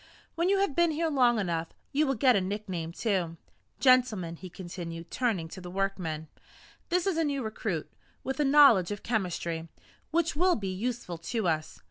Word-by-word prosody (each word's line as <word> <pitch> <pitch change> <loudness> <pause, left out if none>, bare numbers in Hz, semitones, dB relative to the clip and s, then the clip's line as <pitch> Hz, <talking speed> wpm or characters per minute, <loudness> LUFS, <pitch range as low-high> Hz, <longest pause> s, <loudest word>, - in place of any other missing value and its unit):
When 340 +2 +1
you 395 - +4
have 350 -9 0
been 345 -1 +4
here 320 +1 0
long 245 -4 +4
enough, 170 -5 -1 0.2
you 300 +2 +2
will 270 - +1
get 250 +1 +4
a 200 - +3
nickname, 185 -4 -4
too. 180 -4 -1 0.4
Gentlemen," 230 -10 +3
he 185 - -9
continued, 170 -2 -7
turning 220 -10 0
to 185 - -9
the 180 - -8
workmen, 180 -5 -2 0.6
"this 355 0 +1
is 385 -4 +1
a 330 - +2
new 280 -3 -1
recruit, 215 -6 -3 0.4
with 265 +2 -3
a - - +4
knowledge 275 -10 +6
of 205 -1 -5
chemistry 170 -6 -2 0.4
which 330 0 +1
will 360 +3 +3
be 195 -3 -3
useful 210 -4 -3
to 215 +4 -2
us. 155 -2 -1
210 Hz, 180 wpm, -29 LUFS, 175-275 Hz, 0.6 s, knowledge